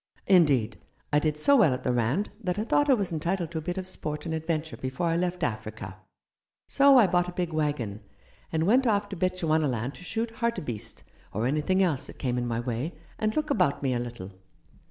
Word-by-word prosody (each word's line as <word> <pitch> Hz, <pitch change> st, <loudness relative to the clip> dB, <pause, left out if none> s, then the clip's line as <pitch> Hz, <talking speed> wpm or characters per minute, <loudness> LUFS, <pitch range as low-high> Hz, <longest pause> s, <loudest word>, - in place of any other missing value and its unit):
Indeed, 140 Hz, -, +3 dB, 0.3 s
I 150 Hz, -, +6 dB
did 150 Hz, 0 st, 0 dB
so 280 Hz, -, +4 dB
well 190 Hz, -, +5 dB
at 130 Hz, -, -8 dB
the 125 Hz, -, +1 dB
Rand 125 Hz, -, 0 dB
that 180 Hz, -1 st, -1 dB
I 210 Hz, -, 0 dB
thought 290 Hz, +5 st, +2 dB
I 265 Hz, -, +7 dB
was 200 Hz, -6 st, -2 dB
entitled 170 Hz, +1 st, -2 dB
to 160 Hz, -, -2 dB
a -, -, -6 dB
bit 175 Hz, +4 st, -4 dB
of 185 Hz, -1 st, -4 dB
sport 150 Hz, -4 st, -4 dB
and 165 Hz, -, -3 dB
adventure 160 Hz, 0 st, -2 dB
before 130 Hz, +6 st, -3 dB
I 165 Hz, 0 st, +1 dB
left 180 Hz, +1 st, -1 dB
Africa 110 Hz, -4 st, -4 dB, 0.4 s
— -, -, -65 dB, 0.3 s
so 275 Hz, -1 st, +6 dB
I 235 Hz, -, +7 dB
bought 180 Hz, -1 st, +1 dB
a -, -, -8 dB
big 175 Hz, -2 st, -2 dB
waggon, 145 Hz, -10 st, -1 dB, 0.5 s
and 160 Hz, 0 st, +1 dB
went 250 Hz, +6 st, +4 dB
off 205 Hz, -2 st, +1 dB
to 195 Hz, -, -5 dB
Bechuanaland 155 Hz, -, 0 dB
to 180 Hz, -, -12 dB
shoot 225 Hz, +4 st, -2 dB
hartebeest, 150 Hz, -, -3 dB, 0.3 s
or 110 Hz, +4 st, -1 dB
anything 155 Hz, +8 st, +2 dB
else 155 Hz, -8 st, 0 dB
that -, -, -11 dB
came 125 Hz, -2 st, -1 dB
in 120 Hz, -, -2 dB
my 115 Hz, -1 st, -1 dB
way, 125 Hz, +7 st, -3 dB, 0.2 s
and 215 Hz, 0 st, 0 dB
look 305 Hz, -1 st, 0 dB
about 180 Hz, -, +1 dB
me 130 Hz, -2 st, +1 dB
a 120 Hz, -, 0 dB
little. 120 Hz, -6 st, -6 dB
160 Hz, 215 wpm, -27 LUFS, 125-190 Hz, 0.5 s, I